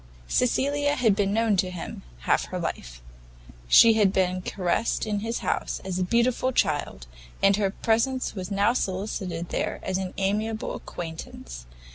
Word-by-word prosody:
Cecilia 285 +3 +1
had 225 -7 +3
been 200 -1 +1
known 220 -1 +2
to 185 0 +1
him 180 -2 -7 0.2
half - - +2
her - - -5
life; - - -5 0.6
she 225 - +8
had 210 -3 +3
been 185 -1 +1
caressed 180 +4 -1
in 210 -1 -1
his 225 +3 -2
house - - -1
as 185 -1 -2
a - - +1
beautiful 235 +5 +1
child, 145 - 0 0.4
and 195 0 +6
her 200 -2 +1
presence 230 +6 0
was 185 -2 -5
now 200 +3 +2
solicited 185 -5 -3
there - - -2
as 190 0 -1
an 185 -1 -5
amiable 215 +3 -1
acquaintance. 110 - -8
200 Hz, 155 wpm, -26 LUFS, 180-225 Hz, 0.6 s, she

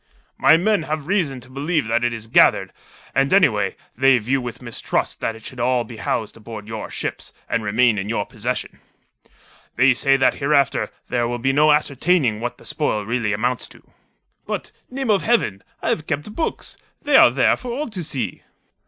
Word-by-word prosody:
"My 160 - +5
men 205 +2 +2
have 155 -2 -4
reason 170 -9 0
to 125 - -14
believe 145 +2 -1
that 115 +2 0
it 120 - +1
is 115 -1 -6
gathered; 115 - +4 0.4
and, 135 0 +2
anyway, 110 - +3 0.2
they 135 +1 +5
view 125 +4 0
with 120 0 -6
mistrust 120 -3 -3
that 115 - -2
it 110 - -14
should 130 - -9
all 125 0 +1
be 120 -1 -11
housed 110 0 -2
aboard 110 -1 -9
your 110 -1 -6
ships, - - -5 0.2
and 115 - 0
remain 110 +1 +2
in 100 +2 -4
your 105 -3 -1
possession. 120 +3 -4 1.0
They 130 +1 +5
say 135 +2 +3
that 135 - +3
hereafter 140 -1 +1 0.2
there 120 -1 0
will 120 +1 -2
be 135 +3 0
no 150 +2 +5
ascertaining 145 -4 +2
what 120 +1 -4
the - - -17
spoil 110 -9 -1
really 115 -1 -1
amounts 120 +4 -1
to." - - -19 0.6
"But - - -4 0.2
name 260 -3 -1
of 200 - +3
Heaven! 220 - +1 0.2
I - - 0
have 155 - -1
kept 150 +7 -3
books. 320 - -4 0.3
They - - +2
are - - +9
there - - +3
for 250 - -7
all 285 +6 -3
to 190 -5 -5
see." 130 - -4
125 Hz, 190 wpm, -21 LUFS, 115-150 Hz, 1.0 s, are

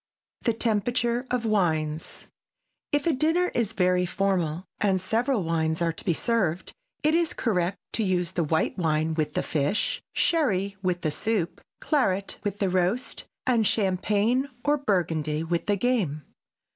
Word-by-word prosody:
[Sidenote: - - -22
THE - - -21
TEMPERATURE 240 +3 +1
OF 250 -2 -1
WINES] 160 -7 -1 0.6
If 290 -1 +1
a 335 - +3
dinner 325 +6 +2
is 220 -3 0
very 180 -1 +2
formal 180 -3 0
and 195 -2 +2
several 225 +4 0
wines 160 -1 0
are 170 -1 +1
to - - -10
be 175 - +2
served, 185 -7 0 0.3
it 305 +1 +3
is 335 -1 +2
correct 185 -5 0 0.2
to 225 - +1
use 180 -3 +1
white 165 0 0
wine 160 -1 +1
with 155 -2 -1
the - - +1
fish, 150 +6 0
sherry 200 - +1
with 180 -2 0
the 155 - 0
soup, 210 -2 -1 0.2
claret 200 - 0
with 205 -1 -2
the 195 -2 +1
roast 185 +7 0 0.2
and 235 -4 +3
champagne 210 +6 +1 0.2
or 295 0 +3
Burgundy 160 - 0
with 170 +4 -2
the 205 -1 +2
game. 190 - 0
195 Hz, 155 wpm, -26 LUFS, 170-235 Hz, 0.6 s, a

